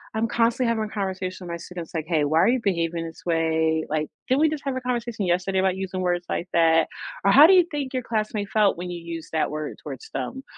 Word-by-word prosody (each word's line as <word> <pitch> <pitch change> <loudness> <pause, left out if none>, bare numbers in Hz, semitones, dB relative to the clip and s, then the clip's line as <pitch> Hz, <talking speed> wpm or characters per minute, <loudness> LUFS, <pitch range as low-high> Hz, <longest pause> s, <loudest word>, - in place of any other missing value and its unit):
I'm 220 +1 +1
constantly 235 +2 +1
having 220 -2 0
a 210 - -9
conversation 190 -2 -4
with - - -5
my - - -3
students 170 -1 -8
like, 160 -1 -2
"Hey, 160 -4 +2
why 155 +3 +2
are 185 - +5
you 255 +2 +3
behaving 170 -3 -1
this 165 - -11
way? 160 -1 +1
Like, 155 0 -1 0.2
didn't 260 +3 +3
we 315 - +5
just 305 -2 -4
have 270 -1 -1
a 260 - -3
conversation 240 -4 -2
yesterday 185 +2 +1
about 190 0 +1
using 190 -1 -4
words 175 -1 0
like 175 - -2
that?" 165 -1 +4 0.4
or 200 - +6
"How 290 +7 +9
do 385 - +6
you 360 -2 +6
think 280 -3 -3
your 255 -1 -1
classmate 215 -3 -2
felt 210 -4 +3
when 180 +1 -5
you 175 -1 -6
use 165 -1 -7
that 160 - +1
word 155 0 -5
towards 445 - -8
them, 265 +1 -4
190 Hz, 250 wpm, -24 LUFS, 165-230 Hz, 0.4 s, How